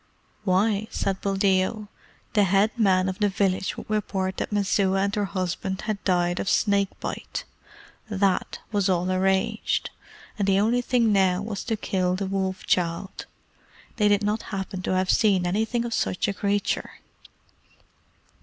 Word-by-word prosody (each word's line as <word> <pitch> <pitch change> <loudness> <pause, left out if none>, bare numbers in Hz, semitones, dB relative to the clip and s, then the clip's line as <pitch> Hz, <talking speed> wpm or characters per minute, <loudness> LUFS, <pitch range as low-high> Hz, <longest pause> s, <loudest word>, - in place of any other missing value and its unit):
Why, 200 +3 +2
said 195 -1 -2
Buldeo, 195 +2 +1 0.5
the 205 -2 +4
head 195 +4 +3
man 190 -5 +3
of 190 +2 -3
the 205 -1 +3
village 190 0 0
would - - -8
report 195 -3 -1
that - - -3
Messua 195 -1 +2
and 200 0 -1
her 210 -2 0
husband 190 0 -3
had 215 -2 -3
died 175 -1 +1
of - - -1
snake 200 -2 +1
bite. - - -5 0.7
THAT 195 -2 0
was 205 -2 +1
all 180 0 +1
arranged, 190 +4 0 0.5
and 200 - +1
the 195 0 +4
only 230 +4 +2
thing 240 -3 +2
now 190 -1 +2
was 205 -2 -4
to 225 -2 -1
kill 185 -3 0
the 195 +1 -2
Wolf 190 -1 -2
child. 175 +2 -1 0.7
They 210 -2 +3
did 205 0 +3
not 210 +2 0
happen 190 -1 -4
to 185 - -1
have 185 0 +2
seen 195 -5 +3
anything 220 +6 0
of 235 - -3
such 185 - 0
a 200 - 0
creature? 200 +1 -1
195 Hz, 155 wpm, -25 LUFS, 185-210 Hz, 0.7 s, the